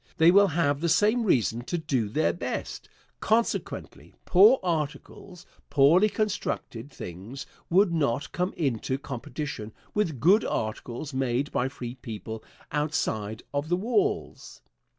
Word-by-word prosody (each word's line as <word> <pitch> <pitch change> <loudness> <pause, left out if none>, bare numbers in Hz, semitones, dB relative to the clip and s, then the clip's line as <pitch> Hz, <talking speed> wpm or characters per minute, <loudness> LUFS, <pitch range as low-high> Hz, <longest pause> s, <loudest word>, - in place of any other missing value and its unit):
They 165 +2 +7
will 200 +2 +6
have 150 -4 0
the 170 - +1
same 215 +8 +3
reason 120 - +2
to 175 - -2
do 135 -9 -1
their 155 +9 +1
best. - - -5 0.3
Consequently, 225 +2 -1
poor 210 +8 +7
articles, 170 +2 -4 0.2
poorly 160 +9 +5
constructed 195 - -3
things, 110 - -8 0.2
would 185 0 +4
not 145 -3 0
come 180 +1 -1
into 130 -4 -1
competition 140 -4 -6 0.2
with 170 - 0
good 190 - +5
articles 120 +6 -4
made 130 +1 -1
by 125 +2 0
free 120 -2 -7
people 110 -3 -7 0.3
outside 120 -8 -2
of 145 +2 -2
the 175 - +2
walls. 380 - -1
150 Hz, 130 wpm, -27 LUFS, 125-180 Hz, 0.3 s, They